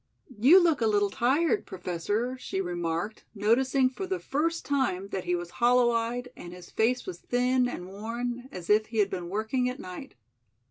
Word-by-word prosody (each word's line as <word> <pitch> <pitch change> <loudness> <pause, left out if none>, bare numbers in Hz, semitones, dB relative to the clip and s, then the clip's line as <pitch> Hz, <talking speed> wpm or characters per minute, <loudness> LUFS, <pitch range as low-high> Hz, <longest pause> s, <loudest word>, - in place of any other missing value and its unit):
"You 290 - +8
look 335 -7 +2
a 225 - +3
little 205 -2 +2
tired, 315 - +1
Professor," 195 +7 -2
she 190 - -4
remarked, 175 +2 -3
noticing 255 +6 +3
for 320 +9 -5
the 375 0 -1
first 330 +3 -1
time 245 -9 0
that 190 -2 -4
he 180 0 +1
was 175 0 -5
hollow 245 0 +5
eyed 235 +2 -2
and 175 0 -9
his 180 -1 -12
face 250 +3 +1
was 370 - -6
thin 250 +1 +1
and 180 -7 -6
worn, 240 +5 -5
as 180 -2 -8
if 215 +1 +3
he 225 - -6
had 200 -2 +3
been 180 -2 -4
working 220 +6 0
at 250 - -6
night. 185 +9 -9
230 Hz, 185 wpm, -28 LUFS, 190-255 Hz, -, You